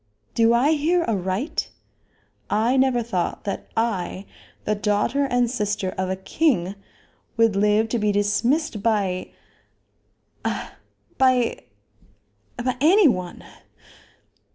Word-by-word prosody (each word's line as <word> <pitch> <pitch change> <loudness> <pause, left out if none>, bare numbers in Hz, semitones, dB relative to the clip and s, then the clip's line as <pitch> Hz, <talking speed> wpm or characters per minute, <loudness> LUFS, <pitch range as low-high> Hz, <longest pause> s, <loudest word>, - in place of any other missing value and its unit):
Do 230 0 +4
I 245 +6 +3
hear 325 +3 +2
aright? 195 - -2 0.8
I 225 +5 +2
never 260 -2 +2
thought 185 -7 -2
that 200 - -4
I, 200 -4 -1 0.4
the 210 - +1
daughter 210 +7 0
and 245 -2 +1
sister 205 -5 -2
of 185 0 -2
a 190 - -1
king, 190 - 0 0.6
would 225 -3 +3
live 210 +2 +3
to 235 - 0
be 210 -1 +1
dismissed 210 +6 0
by 200 -4 0 1.1
a - - -3 0.5
by 255 -3 +2 0.9
a 250 +1 -1
any 360 +5 +6
one." 180 -8 -2
225 Hz, 110 wpm, -23 LUFS, 200-255 Hz, 1.1 s, any